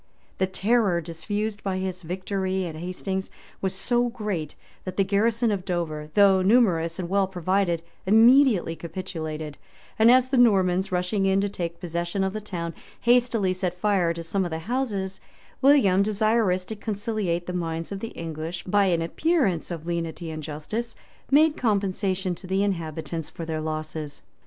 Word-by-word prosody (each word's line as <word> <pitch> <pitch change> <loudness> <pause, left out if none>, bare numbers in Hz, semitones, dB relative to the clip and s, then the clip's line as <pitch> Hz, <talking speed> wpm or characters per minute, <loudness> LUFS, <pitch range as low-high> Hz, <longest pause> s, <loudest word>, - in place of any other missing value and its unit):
204] 190 - +2
The - - -19
terror 200 -2 +2
diffused 205 +6 -4
by 190 -1 -1
his 185 -1 -3
victory 190 +2 -2
at 165 - -5
Hastings 185 +3 -4 0.3
was 190 -1 -1
so 240 +5 +1
great 205 -10 -4 0.3
that 185 - -6
the 195 - +4
garrison 220 +4 +2
of 195 -3 -2
Dover, 160 -5 -3
though 195 -2 +6
numerous 185 -6 +3
and 180 -2 -3
well 195 +1 +2
provided, 185 -1 0 0.2
immediately 225 - +5
capitulated; 160 -3 -6 0.4
and 225 +1 +7
as 255 +1 +5
the 265 -2 +2
Normans, 190 -5 +3
rushing 185 +2 0
in 190 0 +3
to 205 - 0
take 170 -3 -4
possession 175 +2 -2
of 190 0 -1
the 215 - -4
town, 170 -5 -5 0.3
hastily 235 -5 +3
set 180 -1 -3
fire 190 -4 +2
to 170 0 -5
some 190 +4 -1
of 175 - -2
the 160 - -3
houses, 200 -1 -3 0.4
William, 260 -9 +5
desirous 210 -2 +2
to 220 - -6
conciliate 205 -5 -2
the 180 - -4
minds 165 -1 -3
of 200 - -4
the 230 - -4
English 165 +1 -5
by 200 +2 +3
an 170 -3 +1
appearance 240 - +1
of 165 -3 -6
lenity 170 -1 -3
and 155 0 -5
justice, 160 +11 -5 0.3
made 305 +2 +5
compensation 195 -4 0
to 185 - -10
the 190 +2 +1
inhabitants 165 -4 -3
for 165 - -7
their 160 -1 -3
losses. 155 -1 -4
190 Hz, 165 wpm, -25 LUFS, 170-210 Hz, 0.4 s, and